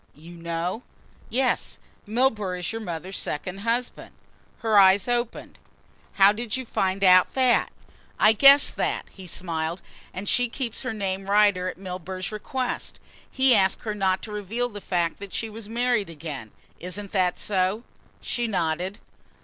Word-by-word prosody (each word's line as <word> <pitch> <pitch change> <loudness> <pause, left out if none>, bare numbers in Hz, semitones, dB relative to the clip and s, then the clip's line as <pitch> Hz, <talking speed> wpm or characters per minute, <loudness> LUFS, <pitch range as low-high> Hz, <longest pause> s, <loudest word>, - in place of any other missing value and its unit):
"You 165 +4 -13
know?" 170 +5 -3 0.5
"Yes, 260 +2 0 0.3
Milburgh 215 -5 0
is 180 - -3
your 225 0 -5
mother's 180 -1 -4
second 180 +5 -3
husband." 235 +4 -3 0.5
Her 220 -2 +4
eyes 195 +1 +5
opened. 240 -1 -3 0.5
"How 195 0 +6
did 225 +2 -3
you 260 - -5
find 195 -3 -1
out 185 -1 +5
that?" 255 -2 +3 0.5
"I 215 - +6
guessed 275 +6 +8
that," - - -1
he 190 -2 -11
smiled, 165 -1 -3 0.3
"and 195 +2 -7
she 245 +2 +2
keeps 235 -2 -4
her 255 - -3
name 195 -2 -4
Rider 205 -3 +3
at - - -8
Milburgh's 185 0 -6
request. 250 +4 -4 0.3
He 265 -1 +4
asked 195 -3 +2
her 215 - -3
not 190 -2 0
to 215 - -7
reveal 215 +4 -3
the 205 -3 -9
fact 175 -4 -1
that 200 -1 -9
she 225 -1 -3
was 215 -1 -9
married 235 -4 0
again. 150 -8 -7 0.3
Isn't 195 +3 -5
that 185 -3 +1
so?" 195 +2 0 0.4
She 240 -1 -2
nodded. 180 0 -2
200 Hz, 155 wpm, -25 LUFS, 185-230 Hz, 0.5 s, guessed